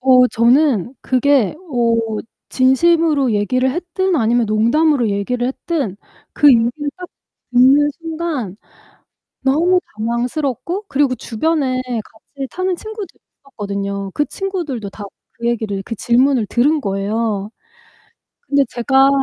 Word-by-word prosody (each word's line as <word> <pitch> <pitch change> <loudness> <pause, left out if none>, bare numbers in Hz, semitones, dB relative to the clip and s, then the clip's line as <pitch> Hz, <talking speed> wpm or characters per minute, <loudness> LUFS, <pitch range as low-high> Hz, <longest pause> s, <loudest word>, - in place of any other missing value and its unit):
어 255 -1 +6
저는 245 - +2
그게 260 -3 +2 0.2
어 235 -2 +2 0.5
진심으로 280 0 +3
얘기를 255 +6 +1
했든 360 +3 -1
아니면 235 -2 +2
농담으로 235 +5 +2
얘기를 225 +5 -1
했든 270 - -3 0.4
그 295 - +5
얘기를 235 -3 +5 0.3
딱 365 -1 -9 0.4
듣는 270 +4 +5
순간 320 - -4 0.8
너무 335 +7 +2 0.2
당황스럽고 250 - -2
그리고 275 -3 +1
주변에 255 +2 -1 0.2
같이 270 +6 -9
사는 370 +1 -1
친구들이 435 0 -8 0.2
있었거든요. 200 -6 -4
그 295 - +1
친구들도 300 - -4
다 205 +1 -9 0.3
그 235 0 -2
얘기를 215 -4 -2
그 230 - -5
질문을 245 +1 +2
들은 290 +9 +2
거예요. 205 0 -2 1.0
근데 280 -1 +3
제가 265 +3 +3
255 Hz, 265 characters per minute, -18 LUFS, 225-300 Hz, 1.0 s, 어